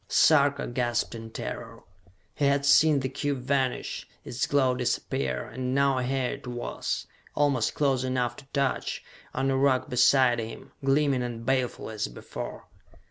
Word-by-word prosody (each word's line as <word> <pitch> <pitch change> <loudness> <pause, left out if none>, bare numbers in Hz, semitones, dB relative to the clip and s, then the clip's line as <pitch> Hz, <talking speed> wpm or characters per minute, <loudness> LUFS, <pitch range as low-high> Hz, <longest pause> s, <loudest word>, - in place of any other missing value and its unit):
Sarka 145 -3 +4
gasped 120 -1 -1
in 115 -1 -7
terror. - - -7 0.5
He 145 - 0
had 140 0 +2
seen 145 0 +5
the 130 - -1
cube 135 0 -3
vanish, 130 -1 -1 0.2
its 120 - -2
glow 135 -3 +3
disappear, 70 - -2
and 125 +2 -3
now 140 -1 +3
here 130 0 0
it - - -8
was, 120 -1 -3 0.3
almost 140 -6 +1
close 135 -3 +1
enough 130 -2 -1
to 145 - -12
touch, 140 -2 -1 0.3
on 135 +1 +1
a - - +1
rock 135 -1 +2
beside 125 0 +4
him, 115 0 -7
gleaming 135 -1 +2
and 120 -2 -5
baleful 130 -3 -1
as 110 -1 -2
before! - - -8
130 Hz, 150 wpm, -27 LUFS, 120-140 Hz, 0.5 s, seen